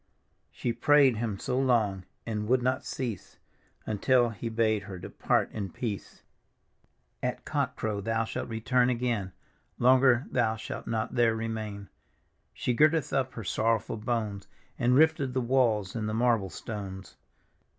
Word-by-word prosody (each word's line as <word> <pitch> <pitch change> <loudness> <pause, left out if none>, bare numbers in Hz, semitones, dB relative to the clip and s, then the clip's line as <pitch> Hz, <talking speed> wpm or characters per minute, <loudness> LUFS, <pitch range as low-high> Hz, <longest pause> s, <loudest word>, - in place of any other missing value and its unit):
" - - -44
She 120 - -2
prayed 135 0 +4
Him 110 -3 -2
so 125 - -1
long 110 -8 +1 0.2
and 105 -2 -3
would 125 +1 +2
not 130 +1 0
cease, 115 -8 -5 0.5
Until 120 +3 +2
He 115 +2 -5
bade 110 -2 +1
her 95 -2 -7
depart 85 - 0
in 100 -3 -4
peace. 115 0 -6 0.5
" - - -41 0.3
At - - -3
cock - - -1
crow 105 -2 -2
thou 115 +2 0
shalt - - -5
return 120 +2 +2
again; 120 -6 -1 0.5
Longer 130 +1 +5
thou 110 -3 +1
shalt 110 - -7
not 110 0 -2
there 120 -2 +3
remain!" 110 -3 -4 0.6
She 125 - -1
girded 155 +4 +3
up 130 -1 0
her 115 - -6
sorrowful 110 +3 0
bones, 105 -3 -3 0.3
And 125 +1 +3
rifted 145 -3 +3
the - - +2
walls 115 -6 +1
and 110 -2 -2
the 110 - -2
marble 115 -4 +2
stones. 95 -3 -7
115 Hz, 150 wpm, -29 LUFS, 105-125 Hz, 0.6 s, Longer